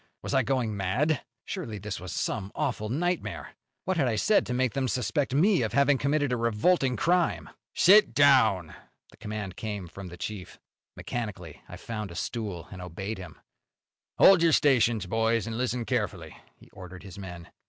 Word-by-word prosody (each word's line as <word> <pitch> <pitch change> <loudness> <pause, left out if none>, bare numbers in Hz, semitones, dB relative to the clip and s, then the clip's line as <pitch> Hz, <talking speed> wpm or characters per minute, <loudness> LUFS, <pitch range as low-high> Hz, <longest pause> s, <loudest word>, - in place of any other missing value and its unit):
Was - - -4
I 135 - +4
going 125 -3 -1
mad? 115 - 0 0.2
Surely 145 - -5
this 105 0 -5
was 90 -1 -7
some 100 +4 -3
awful 125 -8 -2
nightmare! 175 +7 -2 0.3
What 190 -1 0
had 140 -5 +2
I 115 - 0
said 205 - +2
to - - -4
make 130 -2 +1
them 135 -1 -1
suspect 125 +3 -1
me 185 +2 +4
of 110 - -2
having 140 -1 +3
committed 145 -1 +1
a 125 - +1
revolting 125 +5 +2
crime? 175 +3 +1 0.2
"Sit 205 +4 +6
down!" 115 - +4 0.4
The - - -20
command 105 -4 -6
came 105 -5 -5
from 95 +2 -9
the 90 0 -10
chief. 100 -1 -7 0.4
Mechanically 100 -10 -6
I - - -8
found 110 -3 -6
a 85 - -10
stool, 100 -3 -4
and 95 -2 -8
obeyed 95 +4 -6
him. 90 - -10 0.8
"Hold 190 -3 +7
your 165 -2 +4
stations, 120 -9 +3
boys, 115 +3 +1
and 115 0 -5
listen 125 0 -2
carefully," 105 - -3 0.2
he - - -20
ordered 90 0 -11
his 100 0 -10
men. 90 -3 -9
115 Hz, 175 wpm, -27 LUFS, 100-140 Hz, 0.8 s, Hold